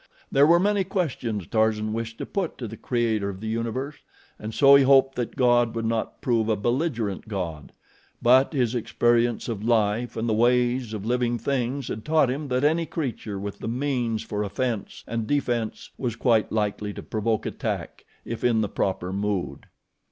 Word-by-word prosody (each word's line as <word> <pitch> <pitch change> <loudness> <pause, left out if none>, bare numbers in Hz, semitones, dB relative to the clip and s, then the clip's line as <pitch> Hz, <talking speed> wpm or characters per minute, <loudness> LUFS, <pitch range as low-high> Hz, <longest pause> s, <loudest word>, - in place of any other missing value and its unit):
There 140 +2 +5
were 170 +1 +6
many 200 +1 +2
questions 130 - -2
Tarzan 110 +1 +1
wished 115 0 -4
to - - -4
put 190 -5 -3
to 120 - -5
the 115 - -8
Creator 115 -4 0
of 95 -1 -7
the 110 - -6
Universe 115 +6 -3 0.4
and 105 +1 -5
so 140 +4 +6
he 140 - +8
hoped 135 0 +5
that 120 -3 -4
God 120 -3 +3
would 115 0 -2
not 115 0 -2
prove 115 -3 +1
a 110 - +3
belligerent 120 - -1
God; 85 -8 -5 0.5
but 130 +3 +5
his 125 -6 0
experience 120 0 +1
of 110 -4 -4
life 115 +1 +1
and 115 +1 -1
the 110 - +1
ways 120 +1 +2
of 105 -1 -6
living 120 0 +1
things 130 +2 -2
had 110 - -5
taught 155 -3 +3
him 145 +3 -4
that 130 0 0
any 160 +2 +2
creature 120 -9 -4
with 100 +1 -6
the - - -5
means 120 -2 -1
for 105 -1 -3
offense 110 +1 -3
and 115 -2 -3
defense 120 -6 -1
was 120 -4 -2
quite 115 -2 +2
likely 105 -1 -1
to - - -7
provoke 110 0 -1
attack - - -4 0.2
if 115 - -5
in 115 -2 +3
the 105 - -1
proper 95 -1 -2
mood. 100 -2 -2
115 Hz, 180 wpm, -25 LUFS, 110-130 Hz, 0.5 s, he